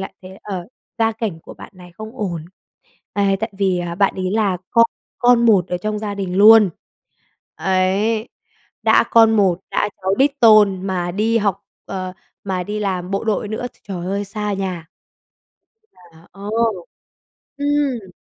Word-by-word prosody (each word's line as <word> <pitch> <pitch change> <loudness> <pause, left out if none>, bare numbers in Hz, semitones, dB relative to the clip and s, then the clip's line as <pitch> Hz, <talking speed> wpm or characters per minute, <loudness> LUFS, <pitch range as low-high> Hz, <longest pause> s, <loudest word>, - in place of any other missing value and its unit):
lại 190 - -6
thấy, 185 - -10
ờ, 185 -4 -5 0.3
gia 225 0 +2
cảnh 215 -7 -4
của - - -12
bạn - - -12
này 180 -1 -14
không 220 +5 -10
ổn, 175 -6 -3 0.7
à, 200 -1 +1
tại 220 - -2
vì, 190 -3 +1
à, 175 -1 -4
bạn 200 +2 +2
ấy 185 -1 -2
là 205 -4 +1
con 230 0 +5 0.3
con 240 -1 +4
một 190 -5 +4
ở 180 - -2
trong 210 +3 -3
gia 205 -1 -4
đình 190 -2 -4
luôn. 210 -1 +7 0.8
Ấy, 195 +4 0 0.5
đã - - +4
con 225 -1 +5
một, 190 -3 +2
đã - - 0
cháu 190 +1 +1
đích 280 +1 +2
tôn 205 -4 +5
mà 175 -2 -2
đi 225 +4 +1
học, 200 -2 -1 0.2
ờ, 185 -1 -5 0.3
mà 185 -2 -2
đi 210 +3 -4
làm 185 -2 -2
bộ 195 +2 -2
đội 215 -1 -1
nữa, 220 +3 -4
tr - - -28
trời 180 -2 -5
ơi, 200 +2 -2
xa 210 +1 -4
nhà. 185 -4 -4 1.1
Là 170 -2 -20
Ờ. 200 +1 -8 1.1
Ừm. 285 -8 -1
200 Hz, 170 wpm, -19 LUFS, 185-220 Hz, 1.1 s, luôn